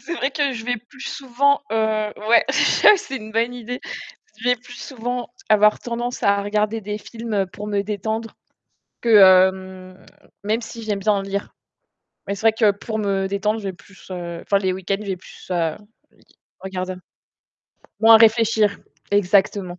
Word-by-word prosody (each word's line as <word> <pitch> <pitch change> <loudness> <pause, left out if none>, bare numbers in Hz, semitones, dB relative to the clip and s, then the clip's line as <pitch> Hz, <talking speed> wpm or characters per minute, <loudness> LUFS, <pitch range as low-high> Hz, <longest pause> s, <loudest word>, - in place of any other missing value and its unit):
c'est 345 - -5
vrai 270 -3 -1
que 285 -2 0
je 225 -3 -7
vais 245 0 -1
plus 255 - -17
souvent 275 +1 0
heu, 225 - -2 0.5
ouais, 235 - +6
ça, - - +5
c'est 270 -6 -6
une 220 -2 -9
bonne 230 +2 0
idée. 245 +1 -6 0.6
Je 245 - -1
vais 250 - +4
plus 245 +1 -14
souvent 245 -1 -5 0.2
avoir 210 0 +4
tendance 240 +1 -4
à 200 0 +3
regarder 210 +2 -1
des 210 +1 -5
films 220 -3 -3
pour 210 - -7
me 200 -1 0
détendre 220 +2 -4 0.7
que 235 - -3
hem, 185 0 +3 0.4
même 220 +3 0
si 230 0 -9
j'aime 205 -2 -2
bien 205 0 +1
lire. 195 +1 -4 0.7
Mais 200 - -2
c'est 200 - -9
vrai 225 - +6
que 220 -1 +3
pour 220 +1 -5
me 195 -2 0
détendre, 210 +3 -1
je 205 - -11
vais - - -4
plus 190 +1 -18
heu, 170 -2 -6
enfin 200 - +1
les 190 -2 0
week-ends, 190 +1 -2
je 215 - -8
vais 190 - -2
plus, 180 - -15
heu, 165 -3 0 0.4
i - - -27 0.4
regarder 185 -1 -4
un 185 - -13 1.0
moins 225 0 +8
à - - +9
réfléchir 220 -2 +3 0.3
exactement. 195 -2 +1
210 Hz, 180 wpm, -21 LUFS, 195-230 Hz, 1.0 s, à